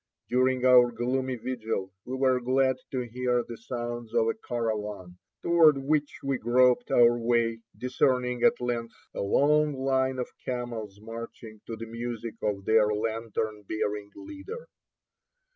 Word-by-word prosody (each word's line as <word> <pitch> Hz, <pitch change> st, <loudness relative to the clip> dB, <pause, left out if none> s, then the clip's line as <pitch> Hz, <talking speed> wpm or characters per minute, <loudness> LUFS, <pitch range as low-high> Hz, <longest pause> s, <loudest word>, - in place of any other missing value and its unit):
During 130 Hz, 0 st, +2 dB
our 125 Hz, -1 st, +7 dB
gloomy 130 Hz, +2 st, -1 dB
vigil 110 Hz, -6 st, -4 dB
we 130 Hz, -, -4 dB
were 130 Hz, -1 st, +2 dB
glad 130 Hz, +1 st, +2 dB
to 130 Hz, -, -2 dB
hear 125 Hz, 0 st, -1 dB
the 120 Hz, -, -6 dB
sounds 120 Hz, -1 st, -5 dB
of 115 Hz, -, +3 dB
a -, -, +1 dB
caravan, 105 Hz, -6 st, -4 dB, 0.2 s
toward 165 Hz, -4 st, +6 dB
which 145 Hz, +2 st, -1 dB
we 135 Hz, -2 st, -1 dB
groped 125 Hz, +1 st, +3 dB
our 120 Hz, 0 st, +5 dB
way, 115 Hz, -1 st, +1 dB, 0.2 s
discerning, 125 Hz, -1 st, +1 dB
at -, -, +4 dB
length, 120 Hz, -1 st, -3 dB, 0.2 s
a -, -, -3 dB
long 150 Hz, +8 st, +3 dB
line 130 Hz, 0 st, +1 dB
of 125 Hz, -, -4 dB
camels 115 Hz, -5 st, -5 dB
marching 115 Hz, -1 st, -9 dB
to 115 Hz, -, -4 dB
the 115 Hz, -, -7 dB
music 115 Hz, 0 st, -5 dB
of 100 Hz, -2 st, -2 dB
their 110 Hz, -1 st, +4 dB
lantern 110 Hz, 0 st, -2 dB
bearing 105 Hz, -1 st, -2 dB
leader. 405 Hz, +12 st, -9 dB
120 Hz, 145 wpm, -28 LUFS, 115-130 Hz, 0.2 s, our